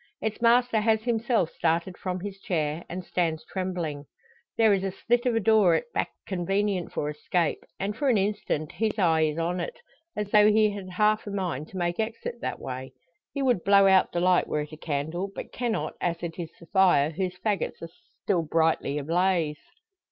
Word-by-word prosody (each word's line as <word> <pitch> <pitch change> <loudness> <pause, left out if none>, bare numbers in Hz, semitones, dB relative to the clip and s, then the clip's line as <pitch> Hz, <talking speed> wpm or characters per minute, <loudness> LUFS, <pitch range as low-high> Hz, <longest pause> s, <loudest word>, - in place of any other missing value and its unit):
Its 220 0 -3
master 235 -1 +4
has 220 0 +2
himself 230 -6 +1
started 170 +2 0
from 185 -1 -4
his 195 0 -6
chair, 160 -3 -2
and 180 +1 -5
stands 165 -3 -1
trembling. 175 -6 -4 0.5
There 220 -2 +5
is 195 -1 0
a 195 - 0
slit 240 +6 0
of 240 - +2
a - - +3
door 210 -5 +4
at 240 +8 -3
back - - 0 0.2
convenient 195 0 -1
for 145 - -2
escape; 150 +2 -1 0.2
and 200 +2 -2
for 280 +3 0
an 235 - +4
instant 195 -6 -1
his 215 +4 -1
eye 165 -5 +3
is 155 0 -2
on 170 +2 -1
it, 170 - -4 0.4
as 210 -1 -3
though 210 0 +6
he 215 0 +4
had 200 -2 -7
half 210 +3 +1
a - - -3
mind 180 -7 -3
to 190 - -9
make 175 +1 -1
exit 230 +1 -4
that - - -3
way. 130 0 -6 0.4
He 280 - -2
would 245 -9 +2
blow 200 0 +6
out 190 -1 +5
the 175 - -1
light 180 0 +3
were 150 - -1
it 150 - -7
a - - -7
candle; 160 +5 -3
but - - -7
cannot 225 -11 -2
as 170 -1 -1
it 170 +1 -5
is 165 -2 -4
the 170 - -13
fire, 175 -6 +4
whose 185 +2 -3
faggots 200 -2 -2
are 165 - -6 0.3
still 180 -4 +2
brightly 160 -2 +1
ablaze. 165 0 +1
185 Hz, 200 wpm, -27 LUFS, 165-210 Hz, 0.5 s, though